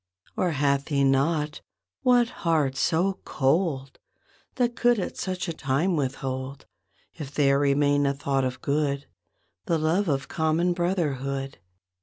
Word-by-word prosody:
Or 180 - +1
hath 140 -1 +1
he 140 -3 +1
not, 150 +3 +1 0.4
what 245 -2 +4
heart 155 -6 +1
so 180 +7 +1
cold 135 -2 0 0.6
That 240 -1 0
could 240 -1 +3
at 190 - -3
such 185 0 -3
a 170 - -2
time 155 +6 0
withhold— 135 -1 -3 0.5
If 145 -2 -8
there 140 -1 +3
remaineth 145 0 +2
aught 135 -1 +1
of 130 0 -3
good— 140 -1 0 0.6
The 165 - +2
love 165 +6 +1
of 135 -3 -1
common 160 +2 +1
brotherhood? 140 - -2
145 Hz, 130 wpm, -26 LUFS, 135-170 Hz, 0.6 s, what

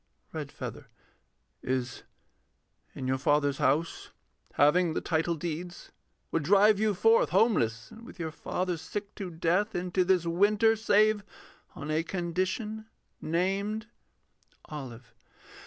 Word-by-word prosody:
REDFEATHER. - - -6 0.7
Is 130 -1 -2 0.9
in 130 - -5
your 130 +1 0
father's 145 0 +2
house 155 +5 0 0.4
Having 160 +3 +3
the - - +1
title 165 +1 0
deeds 175 +2 -6 0.4
would 165 - +1
drive 200 +6 +5
you 215 -1 +1
forth. 225 +5 +4
Homeless, 115 - +1
and 225 - -13
with 235 - -12
your 160 -3 -4
father 180 +2 -3
sick 200 +5 -6
to 190 -3 -6
death, 175 +6 0
Into 180 +1 0
this 180 -2 +2
winter, 205 +6 +3
save 215 -1 +3 0.5
on 150 +1 -5
a 155 +1 +2
condition 185 +6 -3 0.3
Named.... 195 +6 -1 0.8
OLIVE. 125 -5 -8
175 Hz, 120 wpm, -29 LUFS, 155-205 Hz, 0.9 s, drive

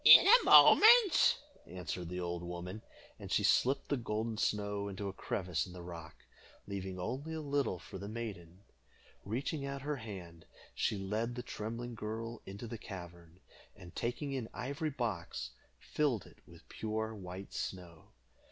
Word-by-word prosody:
"In - - +11
a 475 +4 +8
moment," 440 -3 +8 0.3
answered 90 -1 -5
the 90 +1 -4
old 85 -1 -3
woman, 90 +4 -6 0.4
and - - -8
she - - +2
slipped 135 +3 +3
the 145 - +1
golden 110 -1 -2
snow 105 -1 -1
into 100 0 -4
a 95 - -4
crevice 90 -2 -2
in 90 - -11
the 90 -1 -9
rock, 85 -3 -8 0.5
leaving 95 -2 -5
only 140 - -4
a - - -3
little 140 -9 0
for 95 - -9
the 100 - -6
maiden. 100 -5 -7 0.6
Reaching 135 +7 -2
out 140 0 -4
her 150 0 -2
hand, 90 -8 -9 0.3
she 105 - 0
led 110 +5 -2
the 125 - -5
trembling 120 +1 -5
girl 115 +1 -5
into 100 +4 -7
the 115 -1 -6
cavern, 85 -3 -10 0.3
and, 90 -1 -13
taking 130 +4 -2
an 120 -4 -4
ivory 140 +5 -2
box, 95 - -3 0.3
filled 135 - 0
it - - -17
with - - -16
pure 110 0 -3
white 95 -1 -8
snow. 85 -4 -6
105 Hz, 160 wpm, -34 LUFS, 90-120 Hz, 0.6 s, In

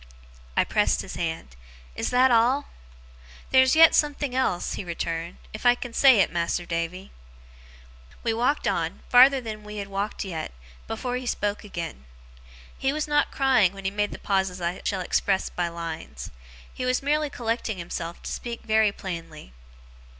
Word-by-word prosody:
I - - +5
pressed - - +1
his - - -8
hand. 160 - -4 0.4
'Is - - -2
that 255 +1 +4
all?' 245 +5 +3 0.8
'Theer's 260 +2 +5
yet 325 0 +8
a - - -11
something 290 -3 +1
else,' 255 -9 0
he - - -4
returned, 170 -1 -4 0.2
'if 215 - -7
I 245 0 +6
can 245 -1 -7
say 260 -4 +6
it, - - +1
Mas'r 170 0 -1
Davy.' 170 +3 -4 1.1
We 225 - +1
walked 245 +6 +1
on, - - -2
farther 265 +2 +7
than 215 -3 -7
we 210 0 -8
had 200 -1 -4
walked 200 +2 -3
yet, 165 - -5 0.3
before 245 +2 -3
he 250 0 -6
spoke 205 -2 -1
again. 170 - -6 0.7
He 270 - 0
was 305 +1 -2
not 295 0 +2
crying 255 -9 +3
when 195 -1 -10
he 190 - 0
made 205 0 0
the - - -7
pauses 190 -2 -1
I 175 +1 -3
shall 195 -3 -1
express 190 +2 0
by 175 -1 -1
lines. 165 - -7 0.4
He - - -5
was 255 +1 0
merely 300 +1 +1
collecting 230 -4 -2
himself 170 -1 -6
to - - -5
speak 235 -1 -5
very 220 -1 +3
plainly. 165 - -8
210 Hz, 170 wpm, -25 LUFS, 175-255 Hz, 1.1 s, yet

